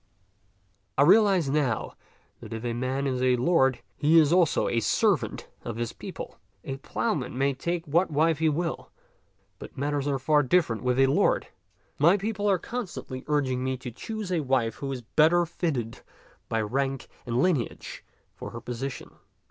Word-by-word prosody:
I 140 - +6
realize 195 -2 +5
now 135 -5 0 0.5
that - - -9
if 115 +1 -5
a 120 - -1
man 130 +3 -2
is 130 -2 -1
a 130 -1 +4
lord, 130 -1 +2
he 155 +3 +4
is 155 0 +5
also 175 -3 +3
a 115 - +1
servant - - +1 0.2
of 115 - -5
his 120 0 -3
people. - - -8 0.2
A 135 - -5
plough 215 +10 -1
man 125 -3 -4
may 140 +1 +2
take 170 +5 -3
what 170 +6 +2
wife 155 0 +2
he 160 -1 +3
will, 165 +2 -3 0.7
but - - -11
matters 145 +1 -1
are 140 -1 +1
far 150 +3 +3
different 135 -5 +1
with 125 0 0
a 135 - +6
lord. 135 - +2 0.5
My 170 +7 +5
people 205 0 -1
are 195 - +4
constantly 180 - -6
urg 145 -3 +1
ing 125 0 -1
me 130 0 -1
to 125 -1 -7
choose 215 - -6
a 175 - +1
wife 130 -5 0
who 140 -1 -4
is 125 -3 -5
better 160 +8 +3
fitted 140 -9 -3 0.5
by 115 - 0
rank 135 +4 -2 0.2
and 120 0 -1
lineage 145 -7 -1 0.3
for - - -8
her 115 - -7
position. 125 +3 -6
140 Hz, 175 wpm, -27 LUFS, 125-165 Hz, 0.7 s, I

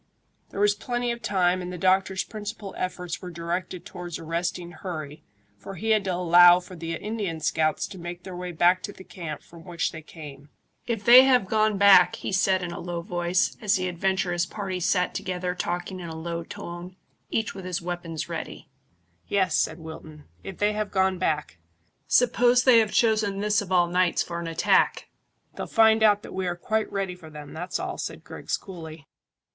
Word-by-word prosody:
There - - -7
was 205 0 +4
plenty 240 +3 -2
of 235 0 -5
time, 185 -3 +1
and 180 0 -5
the 180 - -6
doctor's 190 +1 +2
principal 210 -2 -7
efforts 180 -2 -4
were 180 - -7
directed 175 +1 -4
towards 175 -2 -7
arresting 170 +2 -3
hurry, 155 -4 -7 0.4
for 195 - -8
he 220 +6 -1
had 215 -2 +3
to 185 -2 0
allow 175 0 +7
for 180 +1 -12
the 165 0 -4
Indian 205 -5 -4
scouts 155 0 0
to 190 - -10
make 175 +1 -7
their 185 -2 -8
way 180 0 -5
back 175 +2 +3
to 205 - -5
the 190 - -13
camp 165 -6 -7
from 165 -1 -15
which 170 -2 -2
they 160 - -8
came. 145 -3 -11 0.4
"If 225 -4 -3
they 250 +2 +10
have 250 -6 +4
gone 215 +1 +1
back," 190 -3 +7
he - - -5
said, 190 -1 +2
in 175 - -4
a 170 - -6
low 175 -1 -4
voice, 175 -1 0
as 210 -3 +2
the 185 -1 -1
adventurous 180 -1 0
party 195 -3 -4
sat 180 +1 +1
together 180 -1 -3
talking 180 +1 -3
in 170 -2 -7
a 160 - -7
low 170 +1 -4
tone, 175 +2 -8 0.3
each 220 - -1
with 190 -2 -9
his 180 -2 -2
weapons 170 -2 -5
ready. - - -7 0.6
"Yes," 190 -4 +1
said 160 - +1
Wilton, 160 -2 -10 0.2
"if 195 - -8
they 210 +1 +1
have 210 -1 -2
gone 190 -1 +1
back. 150 - -1 0.5
Suppose 245 0 +4
they 250 -3 +7
have 215 -2 +1
chosen 215 -3 +2
this 210 0 +2
of 190 -2 -8
all 180 -1 +4
nights 180 0 +1
for 170 -1 -5
an 170 - -5
attack!" 165 0 +2 0.5
"They'll - - -5
find 220 -1 +4
that 210 -1 +3
we 190 -1 -2
are 175 - -1
quite 215 +5 -2
ready 195 -2 -2
for 170 -3 -13
them; 150 -1 -10
that's 175 +3 -4
all," - - -4
said - - -5
Griggs - - -4
coolly. 160 -5 -10
180 Hz, 195 wpm, -26 LUFS, 170-200 Hz, 0.6 s, they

